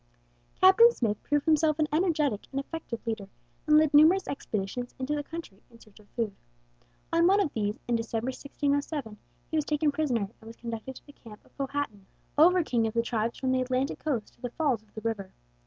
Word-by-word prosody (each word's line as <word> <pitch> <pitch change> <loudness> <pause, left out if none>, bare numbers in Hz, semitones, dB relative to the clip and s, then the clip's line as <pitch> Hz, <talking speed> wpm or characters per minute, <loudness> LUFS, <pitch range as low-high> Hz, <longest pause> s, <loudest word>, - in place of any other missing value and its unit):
Captain 380 +5 +8
Smith 215 - -1
proved 290 -1 0
himself 310 -1 +3
an 310 -1 +2
energetic 305 - +1
and 275 - -2
effective 275 -5 -6
leader, 220 -4 -3 0.4
and 305 0 +6
led 310 -1 +4
numerous 320 +6 +6
expeditions 235 -1 -4
into 265 +3 -2
the 295 - -1
country 290 -10 -9
in 230 -1 -18
search 215 -2 -19
of 205 - -21
food. 225 -4 -2 0.8
On 335 +1 +5
one 395 +2 +5
of 365 -8 0
these, 210 0 -1
in 240 -1 +2
December, 230 +1 -2
1607, 280 -4 -2 0.3
he 315 - +1
was 305 - +1
taken 300 0 +1
prisoner 280 -6 0 0.2
and 220 - -14
was 225 - -10
conducted 230 +2 -6
to - - -14
the 285 - -15
camp 215 -5 -14
of - - -26
Powhatan, 275 -8 -4 0.3
over 355 +4 +6
king 235 -6 +1
of 220 - -5
the 230 - +2
tribes 230 -1 -1
from 260 -1 -1
the 260 0 +2
Atlantic 255 +2 -1
coast 255 -9 -2
to - - -29
the 245 - -3
"falls 265 -4 0
of 215 -1 -28
the 220 - -6
river." 210 -4 -3
260 Hz, 205 wpm, -28 LUFS, 225-305 Hz, 0.8 s, Captain